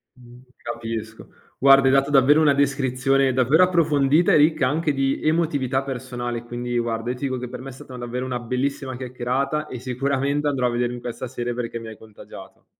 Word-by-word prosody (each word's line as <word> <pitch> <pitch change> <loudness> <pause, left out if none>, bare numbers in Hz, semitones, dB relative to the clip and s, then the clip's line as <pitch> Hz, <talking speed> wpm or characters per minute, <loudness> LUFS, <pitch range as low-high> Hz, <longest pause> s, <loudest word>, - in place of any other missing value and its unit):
Mh, 125 0 -16 0.2
capisco. 115 -2 -6 0.3
Guarda, 135 0 +6
hai - - +5
dato 135 +1 +3
davvero 145 +2 +5
una 150 -2 +5
descrizione 135 -1 +1
davvero 130 +7 +4
approfondita 160 -3 +3
e - - +6
ricca 155 -2 +3
anche 150 +2 0
di 135 0 0
emotività 145 -5 +1
personale, 120 -3 -5
quindi 120 0 -4
guarda 115 0 -2
io 125 - -1
ti 125 - -10
dico 130 -2 -2
che 125 - -5
per 125 0 -8
me 135 - -8
è - - -8
stata 130 0 -11
davvero 125 +1 -4
una 125 -1 -3
bellissima 130 +2 -3
chiacchierata 130 +4 -2
e 125 - -7
sicuramente 140 +3 -1
andrò 135 -4 +1
a - - 0
vedermi 120 0 -2
questa 120 +2 -6
serie 120 0 -4
perché 115 -1 -4
mi 115 - -9
hai 110 - -9
contagiato. 110 -2 -14
130 Hz, 190 wpm, -23 LUFS, 120-140 Hz, 0.3 s, Guarda